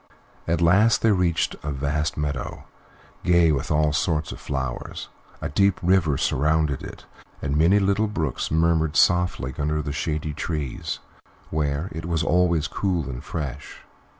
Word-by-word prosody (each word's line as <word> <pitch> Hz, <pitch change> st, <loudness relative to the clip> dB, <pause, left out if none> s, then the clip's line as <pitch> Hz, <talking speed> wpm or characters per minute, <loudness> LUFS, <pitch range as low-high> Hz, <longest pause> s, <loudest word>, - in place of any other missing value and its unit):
At 85 Hz, +1 st, +1 dB
last 100 Hz, +7 st, +4 dB
they 115 Hz, -, +5 dB
reached 90 Hz, -4 st, +1 dB
a 75 Hz, -, -4 dB
vast 70 Hz, +3 st, -1 dB
meadow, 70 Hz, -4 st, -3 dB, 0.6 s
gay 85 Hz, -2 st, +4 dB
with 70 Hz, -3 st, -1 dB
all 75 Hz, -1 st, +2 dB
sorts 75 Hz, +2 st, 0 dB
of -, -, -8 dB
flowers; 65 Hz, -3 st, -4 dB, 0.3 s
a -, -, -2 dB
deep 100 Hz, +5 st, +2 dB
river 85 Hz, -6 st, +3 dB
surrounded 75 Hz, 0 st, +1 dB
it, -, -, -10 dB, 0.3 s
and 70 Hz, 0 st, -2 dB
many 85 Hz, +6 st, +5 dB
little 100 Hz, +2 st, +2 dB
brooks 80 Hz, -10 st, -2 dB
murmured 80 Hz, -1 st, +2 dB
softly 90 Hz, -9 st, +2 dB
under 75 Hz, +1 st, 0 dB
the 70 Hz, -1 st, -4 dB
shady 75 Hz, +1 st, -2 dB
trees, 75 Hz, -3 st, -3 dB, 0.5 s
where 75 Hz, +1 st, -1 dB
it 80 Hz, 0 st, -6 dB
was 85 Hz, -2 st, 0 dB
always 85 Hz, -2 st, +2 dB
cool 90 Hz, -7 st, -1 dB
and 65 Hz, 0 st, -6 dB
fresh. 75 Hz, -6 st, -6 dB
80 Hz, 150 wpm, -24 LUFS, 75-85 Hz, 0.6 s, they